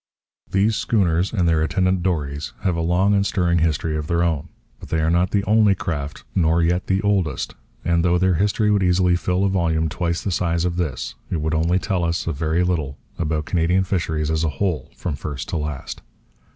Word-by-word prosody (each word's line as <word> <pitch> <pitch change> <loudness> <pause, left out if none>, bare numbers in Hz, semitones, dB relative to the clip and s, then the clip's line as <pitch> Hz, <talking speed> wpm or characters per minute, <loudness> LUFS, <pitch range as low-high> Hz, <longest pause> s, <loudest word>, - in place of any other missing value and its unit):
These 100 +3 +2
schooners 90 -4 +1
and 90 -7 +1
their 80 -2 +3
attendant 90 +3 +1
dories 75 -5 -2
have 90 -3 0
a 85 - -1
long 90 +5 +2
and 100 -1 +3
stirring 90 -4 +1
history 80 -1 0
of 75 -1 -3
their 85 0 +1
own. 80 -1 -1 0.3
But - - -11
they 80 - 0
are 80 +1 +2
not 85 +1 +2
the 100 0 +1
only 105 -1 +4
craft, 75 -6 -4
nor 85 -1 +2
yet 90 +2 0
the 95 +2 +1
oldest; 100 -6 0 0.3
and 85 -1 +2
though 90 0 +3
their 95 +1 +3
history 105 +4 +1
would 100 -1 +3
easily 90 -1 +3
fill 90 +1 0
a - - +3
volume 80 -4 +1
twice 85 +2 -2
the 100 - -1
size 85 -1 0
of 90 -1 -1
this, 65 -8 -2 0.2
it 85 - -1
would 80 +1 -1
only 80 +3 +2
tell 95 -2 -1
us 85 +1 -1
a 85 - -1
very 80 +4 0
little 80 -6 -1 0.2
about 75 -1 -1
Canadian 90 +3 +2
fisheries 80 -5 -1
as 80 0 0
a 80 - +1
whole, 85 +3 -2
from 85 -5 -3
first 70 -2 -6
to - - -1
last. 75 -3 -5
85 Hz, 210 wpm, -22 LUFS, 80-95 Hz, 0.3 s, only